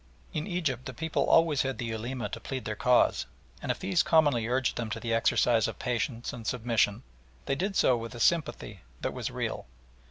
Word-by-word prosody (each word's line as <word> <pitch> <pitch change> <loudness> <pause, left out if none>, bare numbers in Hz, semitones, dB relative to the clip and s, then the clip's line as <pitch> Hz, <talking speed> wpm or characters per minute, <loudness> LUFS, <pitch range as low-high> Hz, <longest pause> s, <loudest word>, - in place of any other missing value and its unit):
In 155 +3 -2
Egypt 145 - -2
the 130 - -7
people 160 +3 -1
always 160 -4 +4
had 135 0 -2
the 120 - -3
Ulema 120 +3 -3
to - - -6
plead 130 -2 -5
their 105 - -3
cause, 125 - +3 0.3
and - - -1
if - - -3
these 185 -3 +1
commonly 145 -10 +3
urged 130 +1 0
them 115 -2 -3
to 110 +1 -3
the 115 0 -2
exercise 115 0 +3
of - - -6
patience 120 0 -2
and 115 -3 -7
submission, 115 -2 +1 0.4
they 135 - 0
did 195 +8 -2
so 130 - +4
with 115 0 -6
a - - -7
sympathy 115 - 0 0.2
that - - -2
was - - -3
real. - - -4
125 Hz, 200 wpm, -29 LUFS, 115-150 Hz, 0.4 s, always